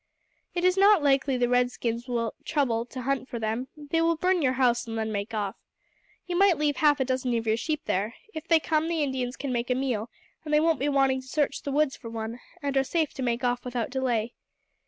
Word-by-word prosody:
It 350 Hz, 0 st, 0 dB
is 365 Hz, +1 st, +3 dB
not 395 Hz, -4 st, +6 dB
likely 270 Hz, -2 st, +2 dB
the 245 Hz, -1 st, +2 dB
red 245 Hz, 0 st, +3 dB
skins 235 Hz, 0 st, -3 dB
will 235 Hz, -2 st, -1 dB
trouble 245 Hz, -6 st, 0 dB
to 255 Hz, 0 st, -7 dB
hunt 270 Hz, 0 st, -1 dB
for 240 Hz, -, -4 dB
them; 225 Hz, +3 st, -2 dB
they 300 Hz, +2 st, -1 dB
will 335 Hz, 0 st, +3 dB
burn 360 Hz, +2 st, +1 dB
your 260 Hz, -3 st, +2 dB
house 245 Hz, -2 st, +2 dB
and 225 Hz, 0 st, -4 dB
then 220 Hz, 0 st, -2 dB
make 200 Hz, +1 st, -3 dB
off. 205 Hz, -3 st, -2 dB, 0.7 s
You 360 Hz, -, -3 dB
might 380 Hz, -2 st, +5 dB
leave 295 Hz, -1 st, 0 dB
half 295 Hz, -3 st, +4 dB
a 265 Hz, -, +1 dB
dozen 255 Hz, -2 st, 0 dB
of 225 Hz, -, -3 dB
your 220 Hz, 0 st, +2 dB
sheep 305 Hz, +6 st, -2 dB
here. 205 Hz, +5 st, -1 dB, 0.2 s
If 315 Hz, +1 st, -7 dB
they 330 Hz, -1 st, +5 dB
come, 310 Hz, 0 st, 0 dB
the 330 Hz, -2 st, 0 dB
Indians 255 Hz, -2 st, -2 dB
can 275 Hz, -2 st, -3 dB
make 240 Hz, 0 st, -2 dB
a 250 Hz, -, +2 dB
meal, 245 Hz, -4 st, -1 dB, 0.3 s
and 305 Hz, -, -6 dB
they 300 Hz, -, +5 dB
won't 320 Hz, -3 st, +2 dB
be 285 Hz, +3 st, +1 dB
wanting 270 Hz, -2 st, +2 dB
to 260 Hz, -, -16 dB
search 290 Hz, +1 st, 0 dB
the 280 Hz, -, -4 dB
woods 290 Hz, -1 st, +2 dB
for 230 Hz, -, -9 dB
one, 225 Hz, +1 st, -5 dB, 0.2 s
and 280 Hz, -1 st, -1 dB
are 270 Hz, -, +4 dB
safe 315 Hz, +2 st, -1 dB
to -, -, -6 dB
make 240 Hz, 0 st, -1 dB
off 245 Hz, 0 st, 0 dB
without 245 Hz, -1 st, -3 dB
delay. 245 Hz, -3 st, -1 dB
260 Hz, 240 wpm, -27 LUFS, 240-300 Hz, 0.7 s, not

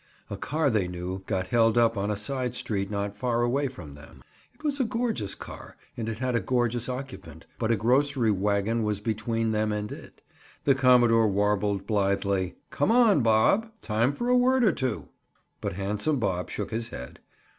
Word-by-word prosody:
A -, -, -2 dB
car 150 Hz, -2 st, 0 dB
they 105 Hz, -5 st, +1 dB
knew 90 Hz, +1 st, -5 dB
got 95 Hz, -3 st, -1 dB
held 115 Hz, 0 st, +3 dB
up 115 Hz, -1 st, +4 dB
on 100 Hz, +1 st, -1 dB
a 105 Hz, -, -1 dB
side 125 Hz, +3 st, -3 dB
street 100 Hz, -5 st, -2 dB
not 100 Hz, -1 st, -3 dB
far 120 Hz, +2 st, 0 dB
away 135 Hz, +4 st, +1 dB
from 90 Hz, -, -10 dB
them. 70 Hz, 0 st, -15 dB, 0.3 s
It 305 Hz, -, -24 dB
was 290 Hz, -2 st, -1 dB
a -, -, +3 dB
gorgeous 230 Hz, -, -2 dB
car -, -, -11 dB, 0.2 s
and 115 Hz, -1 st, -3 dB
it 110 Hz, -, -4 dB
had 130 Hz, +1 st, -1 dB
a 115 Hz, -, +2 dB
gorgeous 120 Hz, -1 st, 0 dB
occupant, 95 Hz, -, -7 dB
but 110 Hz, -, 0 dB
a 115 Hz, -, +4 dB
grocery 125 Hz, +2 st, +2 dB
wagon 100 Hz, +3 st, 0 dB
was 105 Hz, -2 st, -1 dB
between 110 Hz, +1 st, -1 dB
them 110 Hz, 0 st, 0 dB
and 105 Hz, 0 st, -3 dB
it. -, -, -11 dB, 0.4 s
The 140 Hz, -, +4 dB
commodore 120 Hz, -4 st, +5 dB
warbled 100 Hz, 0 st, 0 dB
blithely. 100 Hz, -3 st, 0 dB, 0.2 s
"Come 145 Hz, -, +1 dB
on, 230 Hz, -, +5 dB
Bob. 115 Hz, -, +3 dB
Time 115 Hz, +4 st, +1 dB
for 240 Hz, +12 st, -4 dB
a 250 Hz, -, +4 dB
word 255 Hz, +1 st, +3 dB
or 210 Hz, -, +5 dB
two!" 130 Hz, -7 st, -3 dB, 0.5 s
But -, -, -3 dB
handsome 105 Hz, -, -1 dB
Bob 95 Hz, -6 st, -1 dB
shook 105 Hz, -, -4 dB
his 115 Hz, +1 st, -2 dB
head. 65 Hz, -, -9 dB
115 Hz, 190 wpm, -27 LUFS, 100-130 Hz, 0.5 s, commodore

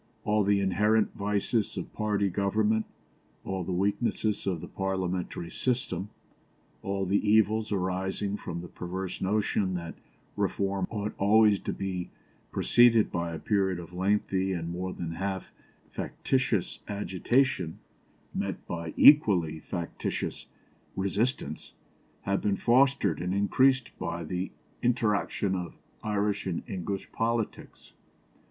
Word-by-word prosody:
All 105 Hz, 0 st, +2 dB
the 100 Hz, 0 st, +3 dB
inherent 105 Hz, +3 st, +2 dB
vices 105 Hz, +2 st, -1 dB
of -, -, -5 dB
party 105 Hz, -2 st, +1 dB
government, 105 Hz, +3 st, +1 dB, 0.6 s
all 95 Hz, -1 st, -2 dB
the 90 Hz, -, -4 dB
weaknesses 100 Hz, +2 st, 0 dB
of 90 Hz, -4 st, 0 dB
the -, -, -7 dB
parliamentary 95 Hz, -3 st, -3 dB
system, 105 Hz, -7 st, -1 dB, 0.7 s
all 95 Hz, 0 st, -1 dB
the 100 Hz, +2 st, +2 dB
evils 110 Hz, +1 st, +3 dB
arising 95 Hz, +1 st, -1 dB
from 85 Hz, -4 st, -5 dB
the 90 Hz, -, -8 dB
perverse 90 Hz, +2 st, -5 dB
notion 100 Hz, -1 st, +1 dB
that 85 Hz, -1 st, -5 dB, 0.4 s
reform 95 Hz, -1 st, 0 dB
ought 105 Hz, -1 st, -3 dB
always 105 Hz, 0 st, +5 dB
to -, -, -3 dB
be 95 Hz, -2 st, -3 dB, 0.4 s
preceded 115 Hz, -2 st, +5 dB
by 85 Hz, 0 st, -2 dB
a 80 Hz, -, -4 dB
period 95 Hz, +1 st, +1 dB
of 85 Hz, 0 st, -9 dB
lengthy 95 Hz, 0 st, +1 dB
and 85 Hz, -1 st, -3 dB
more 90 Hz, +2 st, -3 dB
than 85 Hz, -2 st, -5 dB
half 95 Hz, +2 st, -3 dB, 0.4 s
factitious 130 Hz, -8 st, -1 dB
agitation 100 Hz, -1 st, 0 dB, 0.6 s
met -, -, -3 dB
by 85 Hz, -1 st, -5 dB
equally 90 Hz, -, +6 dB
factitious 85 Hz, +1 st, -4 dB, 0.5 s
resistance, 100 Hz, +7 st, -1 dB, 0.5 s
have 100 Hz, 0 st, 0 dB
been 100 Hz, -2 st, +1 dB
fostered 135 Hz, +3 st, +3 dB
and 90 Hz, +2 st, -1 dB
increased 130 Hz, +5 st, +3 dB
by 85 Hz, 0 st, -3 dB
the 90 Hz, +3 st, -3 dB, 0.3 s
interaction 105 Hz, -4 st, +1 dB
of 90 Hz, -2 st, -5 dB, 0.3 s
Irish 105 Hz, -1 st, 0 dB
and 90 Hz, -3 st, -2 dB
English 95 Hz, +1 st, -4 dB
politics. 115 Hz, -1 st, -3 dB
100 Hz, 120 wpm, -29 LUFS, 90-105 Hz, 0.7 s, equally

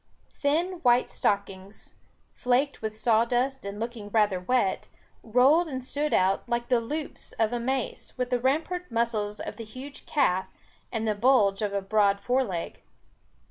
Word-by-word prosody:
Thin 335 Hz, +6 st, 0 dB
white 245 Hz, 0 st, +3 dB
stockings, 200 Hz, 0 st, -3 dB, 0.4 s
flaked 255 Hz, +3 st, 0 dB
with 215 Hz, -1 st, -4 dB
sawdust 240 Hz, +4 st, +1 dB
and 200 Hz, +1 st, -5 dB
looking 230 Hz, -2 st, -5 dB
rather 205 Hz, -3 st, +2 dB
wet, 195 Hz, 0 st, 0 dB, 0.3 s
rolled 265 Hz, +9 st, +4 dB
and 260 Hz, -4 st, -5 dB
stood 295 Hz, +3 st, -2 dB
out, 190 Hz, +1 st, +3 dB
like 235 Hz, 0 st, -1 dB
the 245 Hz, -2 st, +3 dB
loops 295 Hz, +6 st, -5 dB
of 225 Hz, +1 st, 0 dB
a 240 Hz, -, -1 dB
mace, 260 Hz, +2 st, -3 dB
with 250 Hz, 0 st, -2 dB
the 250 Hz, -, +2 dB
rampant 320 Hz, +8 st, -1 dB
muscles 225 Hz, -3 st, -1 dB
of -, -, -6 dB
the 230 Hz, -, -6 dB
huge 255 Hz, +6 st, -10 dB
calf, 190 Hz, -11 st, +1 dB, 0.4 s
and 225 Hz, -2 st, -2 dB
the 215 Hz, -, +2 dB
bulge 210 Hz, -3 st, +3 dB
of 210 Hz, -, 0 dB
the 200 Hz, -1 st, -1 dB
broad 200 Hz, 0 st, +2 dB
foreleg. 245 Hz, -9 st, -2 dB
235 Hz, 155 wpm, -27 LUFS, 210-265 Hz, 0.4 s, rolled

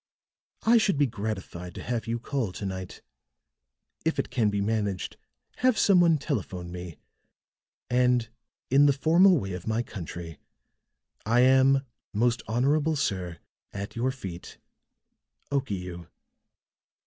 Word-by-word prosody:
"I 230 Hz, +1 st, +6 dB
should 205 Hz, -7 st, +2 dB
be 145 Hz, -, +4 dB
gratified 100 Hz, -6 st, -5 dB
to -, -, -7 dB
have 120 Hz, 0 st, -3 dB
you 115 Hz, +1 st, -1 dB
call 120 Hz, -3 st, -2 dB
to 100 Hz, -, -6 dB
night. 95 Hz, -1 st, -6 dB, 1.0 s
If 160 Hz, -, 0 dB
it -, -, -2 dB
can 120 Hz, -4 st, +2 dB
be 100 Hz, 0 st, -1 dB
managed, 100 Hz, -2 st, -1 dB, 0.4 s
have 255 Hz, -2 st, +3 dB
some 190 Hz, -3 st, +5 dB
one 165 Hz, -2 st, +5 dB
telephone 95 Hz, -, -4 dB
me. 90 Hz, -2 st, -7 dB, 0.9 s
And, 125 Hz, -1 st, +2 dB, 0.4 s
in 140 Hz, +2 st, +6 dB
the 140 Hz, -, +5 dB
formal 170 Hz, +6 st, +5 dB
way 95 Hz, -8 st, -3 dB
of 90 Hz, +1 st, -7 dB
my 110 Hz, +2 st, 0 dB
country, 85 Hz, -6 st, -8 dB, 0.8 s
"I 115 Hz, +3 st, +3 dB
am, 130 Hz, +1 st, +5 dB, 0.3 s
most 120 Hz, +3 st, +1 dB
honorable 145 Hz, +7 st, +2 dB
sir, 95 Hz, -, -2 dB, 0.4 s
at 100 Hz, 0 st, -6 dB
your 120 Hz, +3 st, 0 dB
feet, 95 Hz, -10 st, -7 dB, 0.9 s
"OKIU." 90 Hz, -, -3 dB
115 Hz, 130 wpm, -27 LUFS, 95-140 Hz, 1.0 s, I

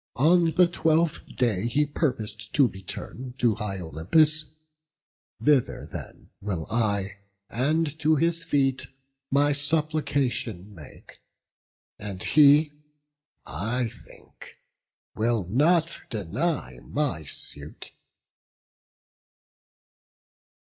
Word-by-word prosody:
On 165 Hz, +5 st, +4 dB
the 175 Hz, +3 st, +4 dB
twelfth 165 Hz, -1 st, 0 dB
day 115 Hz, -5 st, +1 dB
he 145 Hz, +6 st, +2 dB
purpos'd 110 Hz, -8 st, -3 dB
to 140 Hz, -3 st, +5 dB
return 120 Hz, +6 st, -8 dB
To 120 Hz, -4 st, +3 dB
high 100 Hz, -2 st, -3 dB
Olympus; 150 Hz, -, +3 dB, 0.9 s
thither 145 Hz, -4 st, +1 dB
then -, -, -9 dB
will 95 Hz, -6 st, -3 dB
I, 100 Hz, -4 st, 0 dB, 0.3 s
And 155 Hz, +5 st, 0 dB
to 155 Hz, 0 st, +3 dB
his 165 Hz, +2 st, +1 dB
feet 135 Hz, -5 st, +1 dB, 0.4 s
my 145 Hz, +1 st, +3 dB
supplication 145 Hz, -, -1 dB
make; 80 Hz, -6 st, -14 dB, 0.8 s
And 100 Hz, -3 st, -5 dB
he, 150 Hz, 0 st, +6 dB, 0.7 s
I 115 Hz, -, -1 dB, 0.2 s
think, -, -, -15 dB, 0.6 s
will 115 Hz, -1 st, 0 dB
not 160 Hz, -, +2 dB
deny 110 Hz, -, -2 dB
my 140 Hz, -, -2 dB
suit." 70 Hz, +1 st, -8 dB
130 Hz, 90 wpm, -26 LUFS, 105-155 Hz, 0.9 s, he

